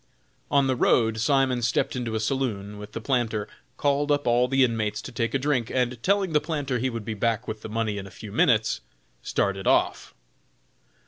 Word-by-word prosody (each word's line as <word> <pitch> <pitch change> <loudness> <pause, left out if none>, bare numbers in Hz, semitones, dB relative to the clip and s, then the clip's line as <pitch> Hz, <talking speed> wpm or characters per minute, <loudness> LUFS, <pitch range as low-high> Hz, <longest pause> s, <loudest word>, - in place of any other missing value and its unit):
On 140 -1 +3
the 130 -1 +1
road 110 -2 +2
Simon 130 0 +2
stepped 120 +3 0
into 120 -3 -3
a - - 0
saloon 110 -4 -2
with 105 +1 -10
the 115 - -4
planter, 115 -4 -1 0.3
called 145 +1 +1
up 145 0 +1
all 120 +1 +3
the 135 +1 +3
inmates 110 -4 0
to - - -7
take 115 +1 -1
a - - +5
drink, 130 -4 0
and 125 -2 -1
telling 195 0 +1
the 150 - +4
planter 145 -5 -2
he 130 +3 0
would 115 -3 -5
be 110 - -3
back 115 +3 -1
with 110 0 -5
the - - -7
money 110 -2 -1
in 100 - -7
a - - -10
few 105 +1 -10
minutes, 110 - +2 0.4
started 95 +7 -1
off. - - +1
120 Hz, 200 wpm, -25 LUFS, 110-135 Hz, 0.4 s, a